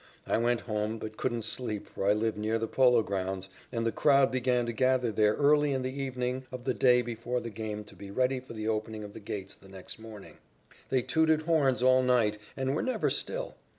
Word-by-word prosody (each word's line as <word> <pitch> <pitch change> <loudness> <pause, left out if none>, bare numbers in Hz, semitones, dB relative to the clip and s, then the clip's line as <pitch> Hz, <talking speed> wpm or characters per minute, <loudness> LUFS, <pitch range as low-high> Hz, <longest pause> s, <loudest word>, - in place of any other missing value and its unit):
I - - +1
went 120 0 +1
home, 110 0 -2
but 110 0 -7
couldn't 120 -2 -2
sleep 110 -5 -3
for 95 - -4
I - - +6
live 110 +1 0
near 110 +2 0
the 115 0 -2
Polo 125 -2 +4
Grounds, 95 -1 -3 0.2
and 115 -2 -2
the 115 - +2
crowd 140 0 +4
began 125 -1 +1
to 120 - -3
gather 130 0 +2
there 105 0 +3
early 145 0 +3
in 130 -1 -1
the 130 0 -3
evening 130 -2 -3
of 130 -1 -7
the - - 0
day 125 -1 +4
before 120 +1 -3
the 120 -1 -6
game 105 0 -5
to 105 - -16
be 100 - -10
ready 130 +5 +1
for 125 -2 -11
the 110 -1 -4
opening 110 0 -2
of 100 -1 -9
the - - -9
gates 100 -2 -6
the 95 - -17
next 95 +2 -10
morning. 110 -3 -11 0.5
They 130 -2 +2
tooted 160 +1 +2
horns 145 -6 +2
all 130 0 +6
night, 120 -5 +2 0.2
and 135 +1 0
were - - 0
never 255 - 0
still. - - -3
120 Hz, 220 wpm, -29 LUFS, 110-130 Hz, 0.5 s, I